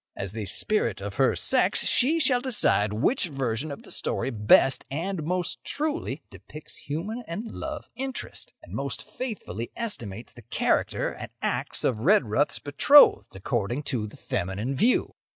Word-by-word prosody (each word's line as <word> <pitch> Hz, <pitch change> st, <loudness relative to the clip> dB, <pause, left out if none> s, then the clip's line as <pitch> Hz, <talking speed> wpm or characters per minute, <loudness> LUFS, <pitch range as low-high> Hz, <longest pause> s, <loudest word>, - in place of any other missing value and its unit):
As 95 Hz, -2 st, -4 dB
the 105 Hz, -1 st, -5 dB
Spirit 215 Hz, -, 0 dB
of -, -, -6 dB
her -, -, +3 dB
Sex -, -, +2 dB
she 300 Hz, +7 st, +3 dB
shall 255 Hz, -6 st, +4 dB
decide 215 Hz, -, +2 dB
which 180 Hz, -, +2 dB
version 135 Hz, -1 st, -2 dB
of 140 Hz, -, -8 dB
the -, -, -11 dB
story 135 Hz, -, -1 dB
best 110 Hz, +4 st, +4 dB
and 170 Hz, +6 st, -3 dB
most 180 Hz, +3 st, -2 dB
truly 290 Hz, -, -3 dB
depicts 105 Hz, -, -10 dB
human 200 Hz, +11 st, -4 dB
and 210 Hz, +7 st, -5 dB
love 310 Hz, -1 st, -6 dB
interest, 265 Hz, +1 st, -6 dB
and -, -, -12 dB
most -, -, -3 dB
faithfully 160 Hz, -, -6 dB
estimates 120 Hz, -, -3 dB
the 120 Hz, -, -13 dB
character 115 Hz, -, 0 dB
and -, -, -8 dB
acts -, -, -1 dB
of 115 Hz, -4 st, +1 dB
Redruth's 145 Hz, -, +2 dB
betrothed 145 Hz, -, +5 dB
according 120 Hz, +6 st, -2 dB
to 110 Hz, -4 st, -1 dB
the 105 Hz, -, -13 dB
feminine 100 Hz, +9 st, -3 dB
view. 235 Hz, -, +2 dB
145 Hz, 150 wpm, -26 LUFS, -, -, betrothed